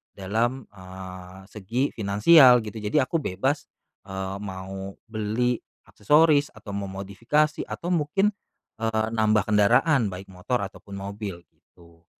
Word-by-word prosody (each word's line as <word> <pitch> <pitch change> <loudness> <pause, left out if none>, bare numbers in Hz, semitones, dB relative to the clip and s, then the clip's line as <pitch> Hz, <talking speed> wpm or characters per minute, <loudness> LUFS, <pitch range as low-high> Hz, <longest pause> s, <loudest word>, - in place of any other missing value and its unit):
dalam, 115 +7 -1
eee, 95 -1 -10
segi 110 +5 -2
finansial 120 +5 +6
gitu. 110 +1 -7
Jadi 110 +8 +1
aku 165 +5 -1
bebas, 135 +5 -2 0.4
eee, 95 0 -4
mau, 95 0 -7 0.2
beli, 110 +3 0 0.2
aksesoris, 150 +5 +3
atau 100 - -10
memodifikasi, 100 +10 -1
atau 175 - -4
mungkin, 180 +5 +1 0.5
eee, 110 -1 0
nambah 110 -2 +2
kendaraan, 110 +5 +4
baik 95 0 -8
motor 100 +5 -2
ataupun 100 0 -9
mobil 100 -3 -6
gitu. 85 -1 -23
105 Hz, 120 wpm, -25 LUFS, 95-125 Hz, 0.5 s, finansial